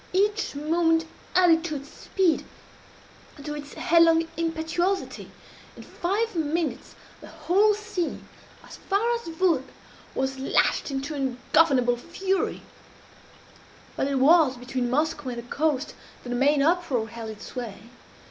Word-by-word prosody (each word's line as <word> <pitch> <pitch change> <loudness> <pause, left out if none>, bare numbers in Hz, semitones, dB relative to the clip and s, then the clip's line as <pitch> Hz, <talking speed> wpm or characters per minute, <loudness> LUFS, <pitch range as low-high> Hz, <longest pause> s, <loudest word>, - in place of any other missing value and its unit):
Each 415 -1 +1
moment 325 +2 +2 0.3
added 335 -3 +5
to 310 -3 -3
its 280 +1 -7
speed 370 -5 0 1.0
to 295 0 -4
its 295 -1 -8
headlong 330 0 +4
impetuosity. 335 +3 -2 0.5
In - - -10
five 410 +5 -2
minutes 315 -4 -2 0.2
the - - -12
whole 415 +4 +2
sea, 415 -5 -3 0.5
as - - -11
far 435 +5 0
as 470 -5 -4
Vurrgh, 330 -3 +2 0.5
was 265 0 -2
lashed 270 - +1
into 275 +2 -3
ungovernable 260 -1 +2
fury; 375 +8 -2 1.3
but - - 0
it 280 - -1
was 285 -1 +5
between 245 0 -3
Moskoe 295 +1 0
and - - -7
the 235 - -5
coast 300 -2 0 0.3
that 245 - -8
the 245 - -1
main 280 +3 +3
uproar 300 -9 +1
held 230 0 -7
its 215 -1 -9
sway. 230 -2 -8
315 Hz, 130 wpm, -26 LUFS, 265-350 Hz, 1.3 s, added